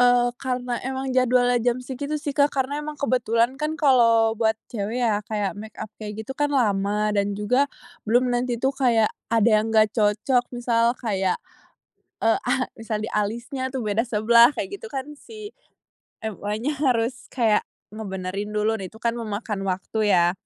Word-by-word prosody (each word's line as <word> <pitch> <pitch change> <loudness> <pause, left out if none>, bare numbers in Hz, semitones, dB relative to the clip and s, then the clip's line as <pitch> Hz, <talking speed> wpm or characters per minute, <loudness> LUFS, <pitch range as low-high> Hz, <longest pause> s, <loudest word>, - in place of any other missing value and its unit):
Eee, 245 0 +5 0.2
karena 250 -1 -2
emang 265 0 -3
jadwalnya 245 -1 +3
jam 245 0 +2
segitu 280 +3 -4
sih 290 - -1
Kak, 285 0 +6
karena 265 +1 0
emang 300 0 -5
kebetulan 235 -3 +2
kan, 305 +1 0
kalau 245 -4 +6 0.3
buat 220 -1 +3 0.2
cewek 220 +2 -3
ya, 215 -2 +2
kayak 210 -2 -1
make 220 0 -10
up, 215 - -7
kayak 210 -1 -6
gitu 245 - -6
kan 290 - +3
lama 200 -2 +1 0.2
dan 200 0 +2
juga, 250 +7 +2 0.4
belum 240 +4 +3
nanti 245 +1 0
tuh 265 - +4
kayak 230 -4 +3 0.3
ada 225 +1 +4
yang 215 - -3
nggak 215 -1 +6
cocok, 220 +4 +2
misal 235 -1 +1 0.2
kayak, 195 -4 +1 0.9
e - - +3
a 245 - -1 0.3
misal 225 -1 -3
di 220 - -3
alisnya 235 +6 -4
tuh 260 - -2
beda 210 +2 +1
sebelah, 235 +2 +6
kayak - - -3
gitu 460 - -7
kan, 265 -10 -4 1.0
si-MUAnya 220 +5 -4
harus 250 -2 0
kayak, 225 -4 +2 0.3
ngebenerin 200 -1 -5
dulu 210 +1 +2
dan 190 - -5
itu 220 - -18
kan 235 - +2
memakan 210 -2 -4
waktu 195 +2 +1
ya. 175 0 +4
230 Hz, 165 wpm, -24 LUFS, 210-250 Hz, 1.0 s, Kak